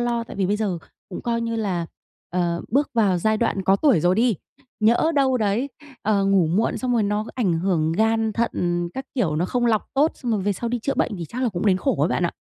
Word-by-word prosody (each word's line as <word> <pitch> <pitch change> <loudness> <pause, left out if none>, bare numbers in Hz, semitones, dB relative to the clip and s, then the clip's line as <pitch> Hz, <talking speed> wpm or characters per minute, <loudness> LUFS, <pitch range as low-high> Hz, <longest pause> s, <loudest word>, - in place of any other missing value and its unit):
lo 235 -1 -1
tại - - -10
vì 190 -2 +1
bây 205 +2 +1
giờ 200 -5 -1 0.3
cũng 185 - -6
coi 230 -1 -1
như 230 0 -2
là, 185 -6 -1 0.4
ờ, 175 -1 0
bước 280 +6 +1
vào 200 -6 +3
giai 220 +4 +1
đoạn 215 -4 0
có 195 +1 +4
tuổi 265 - +3
rồi 175 +3 +3
đi, 230 0 +3 0.5
nhỡ 235 +9 +3
đâu 265 -2 +3
đấy, 220 +5 0 0.3
ờ, 200 -2 +2
ngủ 195 -4 +3
muộn 195 +8 0
xong 250 -1 -1
rồi 230 -3 +2
nó 210 +1 0
ảnh 215 -9 +1
hưởng 165 -3 +1
gan, 225 +3 +1
thận 175 -6 -1
các 265 - -4
kiểu, 175 - 0
nó 170 - +1
không 240 +5 0
lọc 220 -2 +1
tốt 295 +4 +3
xong 240 -2 -3
rồi 210 - 0
về 205 +1 +1
sau 235 +5 -4
đi 245 0 -1
chữa 275 +5 -2
bệnh 210 - 0
thì 170 - -5
chắc 250 - -5
là 245 - +2
cũng 190 +1 -3
đến 190 - +4
khổ 270 +8 0
ấy - - +3
bạn - - 0
ạ. - - -5
215 Hz, 255 wpm, -23 LUFS, 185-235 Hz, 0.5 s, có